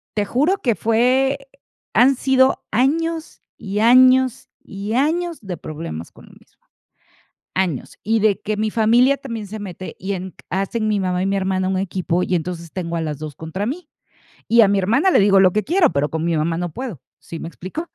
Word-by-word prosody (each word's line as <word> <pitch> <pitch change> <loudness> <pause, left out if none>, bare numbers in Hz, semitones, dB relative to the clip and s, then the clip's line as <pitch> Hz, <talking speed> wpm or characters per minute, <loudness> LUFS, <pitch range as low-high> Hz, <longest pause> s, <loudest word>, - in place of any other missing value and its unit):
te 210 -1 0
juro 295 - +1
que 240 - +2
fue 255 +6 +2 0.6
han 270 +3 +5
sido 260 0 +2
años 320 +7 0 0.2
y 200 +1 -4
años 255 +2 +5
y 200 +3 -6
años 330 +6 0
de 190 -4 -5
problemas 150 - -7
con - - -17
lo - - -18
mismo - - -24 1.0
años. 180 -8 -2
Y 225 +2 +1
de 210 -2 +2
que 215 0 -3
mi 215 0 -1
familia 240 +5 +4
también 230 -6 -6
se 215 +2 -7
mete 185 -2 -8
y 195 +2 -3
en 185 -1 -5
q - - -41
hacen 195 +4 -1
mi 210 -1 +1
mamá 180 -1 -1
y - - 0
mi 195 - 0
hermana 190 -1 0
un 190 0 0
equipo 180 -2 -1
y, - - -2
entonces, 170 -1 -4
tengo 170 -2 -4
a 165 - -1
las 150 -3 -4
2 155 -2 -7
contra 165 +5 -5
mí. 305 +5 -5 0.6
Y 235 0 +6
a 200 - +5
mi 200 - +2
hermana 235 - +2
le - - +4
digo 195 0 +5
lo 185 -1 +5
que 215 +2 +1
quiero, 340 -2 +3
pero 145 +1 0
con 160 +1 -3
mi 170 -1 0
mamá 165 +2 0
no 175 -2 -3
puedo, 235 - -6 0.2
¿sí 165 - -8
me - - -7
explico? 190 - -7
205 Hz, 205 wpm, -20 LUFS, 180-255 Hz, 1.0 s, Y